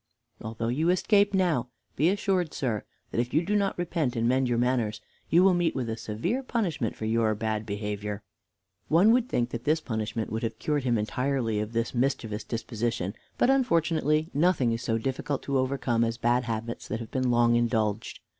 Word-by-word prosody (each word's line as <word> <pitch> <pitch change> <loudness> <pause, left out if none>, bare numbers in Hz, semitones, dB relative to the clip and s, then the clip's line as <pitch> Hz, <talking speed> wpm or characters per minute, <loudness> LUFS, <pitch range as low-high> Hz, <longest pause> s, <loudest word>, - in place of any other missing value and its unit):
Although 115 +1 -3
you 155 +8 +1
escape 200 +3 +3
now, 175 -11 +1 0.3
be 155 +5 +3
assured, 190 -4 0
sir, 115 -6 -2 0.3
that - - -1
if 125 +3 -4
you 165 +2 +3
do 210 - 0
not 200 -1 +1
repent 165 -7 -1
and 115 0 +1
mend 130 +1 +2
your 120 - +1
manners, 120 -3 0 0.3
you 175 +3 +5
will 190 -1 +6
meet 175 -1 +1
with 130 -3 -2
a - - -2
severe 115 - -2
punishment 180 - -2
for 110 - -5
your 110 -1 +2
bad 110 0 -2
behavior." 105 0 -4 0.6
One 180 +8 +5
would 250 +1 +2
think 120 0 0
that 120 0 -5
this 155 +3 +2
punishment 110 -4 -3
would 110 +1 -2
have 115 - -3
cured 145 -3 -1
him 120 -2 +2
entirely 115 0 -1
of 105 +2 -4
this 115 0 -1
mischievous 120 -4 -1
disposition, 115 -4 -3 0.2
but, 255 - +4
unfortunately 165 - +2
nothing 145 -6 +2
is 115 0 -2
so 115 -2 0
difficult 135 +4 -3
to 140 -1 0
overcome 130 -3 0
as 115 0 -1
bad 120 +1 +1
habits 115 0 -4
that 110 - -3
have 115 - -8
been 130 -1 0
long 120 0 +4
indulged. 115 -2 0
125 Hz, 190 wpm, -27 LUFS, 115-160 Hz, 0.6 s, will